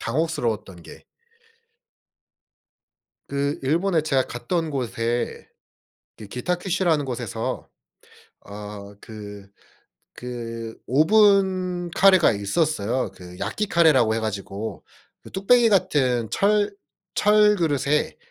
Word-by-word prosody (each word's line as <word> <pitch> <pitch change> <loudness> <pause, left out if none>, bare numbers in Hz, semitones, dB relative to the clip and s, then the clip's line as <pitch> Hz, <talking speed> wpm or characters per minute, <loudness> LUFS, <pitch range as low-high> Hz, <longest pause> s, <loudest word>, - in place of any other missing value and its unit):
당혹스러웠던 115 - -2
게 - - -13 2.2
그 140 +1 -2
일본에 165 +4 +1
제가 135 -4 +1
갔던 165 +6 -2
곳에 120 -3 -3 0.7
그 105 - -10
기타큐슈라는 175 - -1
곳에서 125 -3 -4 0.7
어 100 0 -9
그 105 -2 -10 0.7
그 115 -2 -7
오븐 185 - +3
카레가 185 -1 +5
있었어요. 115 - -1
그 90 -1 -12
야끼 110 - -2
카레라고 155 - +4
해 115 - 0
가지고 105 0 -5 0.4
그 - - -13
뚝배기 230 +5 +4
같은 130 - +1
철 205 0 +2 0.4
철 210 0 +5
그릇에 150 -4 0
140 Hz, 200 characters per minute, -23 LUFS, 115-180 Hz, 2.2 s, 카레가